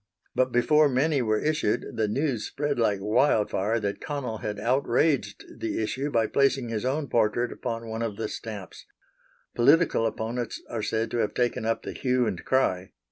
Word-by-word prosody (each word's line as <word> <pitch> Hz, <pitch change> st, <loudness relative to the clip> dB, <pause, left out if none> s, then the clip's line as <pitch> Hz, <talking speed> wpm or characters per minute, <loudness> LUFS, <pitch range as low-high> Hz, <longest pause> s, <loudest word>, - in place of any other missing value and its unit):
But 130 Hz, 0 st, +1 dB
before 150 Hz, +5 st, +4 dB
many 140 Hz, +2 st, +2 dB
were 110 Hz, -2 st, +1 dB
issued 150 Hz, -8 st, 0 dB
the 110 Hz, -1 st, +1 dB
news 125 Hz, -1 st, -1 dB
spread 145 Hz, -2 st, -2 dB
like 105 Hz, -3 st, +2 dB
wildfire 105 Hz, -1 st, +2 dB
that 100 Hz, -1 st, -3 dB
Connell 130 Hz, -7 st, -4 dB
had 105 Hz, -1 st, -4 dB
outraged 125 Hz, -1 st, +1 dB
the 115 Hz, -, -2 dB
issue 130 Hz, +6 st, -2 dB
by 115 Hz, -5 st, +2 dB
placing 135 Hz, -1 st, +1 dB
his 110 Hz, -2 st, -2 dB
own 140 Hz, +3 st, -1 dB
portrait 120 Hz, +1 st, +1 dB
upon 115 Hz, -2 st, -5 dB
one 110 Hz, +1 st, -4 dB
of 110 Hz, -3 st, -3 dB
the 110 Hz, -, -2 dB
stamps. 105 Hz, -4 st, -8 dB, 0.7 s
Political 140 Hz, -2 st, +4 dB
opponents 115 Hz, +2 st, -3 dB
are 115 Hz, -, -4 dB
said 110 Hz, +2 st, -1 dB
to -, -, -1 dB
have 110 Hz, -, 0 dB
taken 120 Hz, -2 st, 0 dB
up 115 Hz, -, 0 dB
the -, -, -5 dB
hue 125 Hz, -1 st, +1 dB
and 95 Hz, -6 st, -3 dB
cry. 95 Hz, -9 st, 0 dB
115 Hz, 175 wpm, -26 LUFS, 110-135 Hz, 0.7 s, before